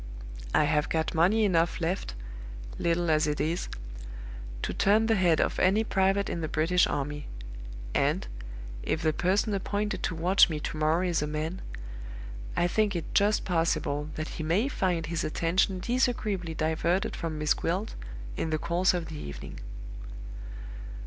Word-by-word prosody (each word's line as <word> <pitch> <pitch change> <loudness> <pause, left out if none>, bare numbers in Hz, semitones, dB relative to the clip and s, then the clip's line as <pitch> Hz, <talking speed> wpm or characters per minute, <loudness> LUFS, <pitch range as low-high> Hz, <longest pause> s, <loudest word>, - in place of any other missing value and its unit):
I - - +6
have 150 0 +2
got 160 0 0
money 195 +7 +4
enough 170 -3 +2
left, 165 - -1 0.6
little 170 0 +2
as 155 -1 +3
it 150 0 -1
is, 165 +3 0 0.9
to - - -1
turn 215 +3 +4
the 225 - +3
head 175 -6 +4
of - - +1
any 195 +4 +4
Private 195 -1 +2
in 170 - -2
the 155 - -1
British 165 +4 +3
army; 145 0 -3 0.7
and, - - +1 0.5
if 160 - -1
the 155 -1 +3
person 195 +6 +2
appointed 205 +2 -1
to 165 - -1
watch 180 +4 +5
me 155 -2 -2
to 150 - -4
morrow 155 +4 +2
is 175 -4 +1
a 150 - 0
man, 155 +5 -3 1.0
I 175 - +4
think 205 +1 +2
it 170 - -4
just 205 +1 +3
possible 165 -4 +1
that 155 0 -3
he 160 - -5
may 180 - +2
find 180 - 0
his 165 +1 -2
attention 180 +4 +1
disagreeably 215 -8 0
diverted 165 +5 +1
from 160 -2 -3
Miss 150 -1 +3
Gwilt 185 +6 -1 0.4
in 160 - -1
the 155 - +1
course 175 +4 +2
of 175 -2 -2
the 155 -2 -6
evening. 70 - -7
170 Hz, 160 wpm, -29 LUFS, 155-190 Hz, 1.0 s, I